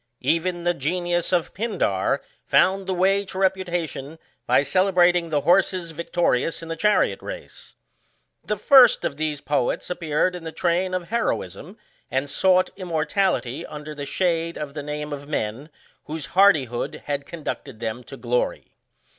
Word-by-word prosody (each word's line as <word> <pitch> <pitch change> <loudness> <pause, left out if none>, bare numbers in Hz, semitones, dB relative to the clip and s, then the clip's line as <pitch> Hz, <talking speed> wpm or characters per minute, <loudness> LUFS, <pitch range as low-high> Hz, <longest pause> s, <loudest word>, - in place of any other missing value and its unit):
Even 175 +2 0
the 175 0 +2
genius 175 +3 -1
of 175 -3 0
Pindar 190 - 0 0.2
found 190 +1 +3
the 190 - 0
way 195 +2 +3
to 185 -1 -9
reputation 175 -6 -1 0.3
by - - +4
celebrating 175 0 +3
the 150 -2 +1
horses 180 +1 +2
vic 170 +2 -8
torious 165 -2 +1
in 165 - -8
the 165 - -2
chariot 210 +6 +2
race. - - -9 0.7
The 210 - -2
first 250 +3 +6
of - - -2 0.3
poets 145 +3 -1
ap 180 - -4
peared 165 +2 +1
in 175 - -8
the 160 - -5
train 180 +2 0
of 180 -2 -4
heroism, 220 -4 -2 0.3
and 135 +2 -1
sought 185 -1 +3
immor 170 -5 -2
tality 150 -8 0
under 150 0 -7
the 145 -1 -6
shade 170 0 0
of 145 -2 -5
the 150 - -5
name 150 0 -5
of 145 0 -7
men, 135 0 -3 0.4
whose 155 -1 -4
hardihood 150 - +2
had 140 -1 -3
conducted 145 -7 -6
them 115 +1 -4
to 135 - -10
glory. 125 -1 -2
170 Hz, 155 wpm, -23 LUFS, 145-185 Hz, 0.7 s, first